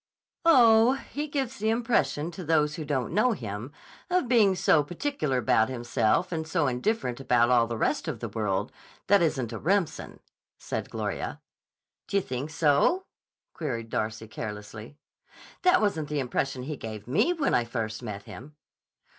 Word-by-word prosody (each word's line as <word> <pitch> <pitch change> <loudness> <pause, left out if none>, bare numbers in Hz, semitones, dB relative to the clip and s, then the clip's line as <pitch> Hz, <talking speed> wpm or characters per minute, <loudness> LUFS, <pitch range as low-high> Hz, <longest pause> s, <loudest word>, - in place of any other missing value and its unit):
"Oh, 235 -6 +6
he 290 +2 -5
gives 265 -3 -3
the 220 - +1
impression 225 -9 0
to 180 +2 -8
those 150 -2 +2
who 155 - -5
don't 140 -2 -2
know 225 +5 +3
him 110 - -6 0.4
of 360 -7 +1
being 220 -6 +4
so 160 -3 +4
particular 165 - -2
about 110 -1 +2
himself 120 +6 0
and 160 -2 -3
so 165 -2 +1
indifferent 130 - -1
about 120 -2 +3
all 120 -2 +4
the 115 -1 -4
rest - - 0
of - - -3
the - - -4
world 105 -4 -2 0.3
that 200 -1 +4
isn't 130 -8 0
a 110 - -5
Remsen," 175 -2 -1 0.4
said - - -5
Gloria. - - -4 0.7
"D'you 200 - +2
think 130 -1 -4
so?" 155 - +2 0.5
queried 120 -8 -4
Darcy 110 +1 -3
carelessly. 105 +4 -8 0.6
"That 365 0 +4
wasn't 160 -8 0
the 150 -1 -1
impression 130 0 -2
he 150 +2 -5
gave 110 -3 -7
me 160 - +2
when 310 -5 0
I 120 - +3
first 115 -2 -4
met 100 -1 -6
him." 145 +8 -11
150 Hz, 160 wpm, -27 LUFS, -, 0.7 s, Oh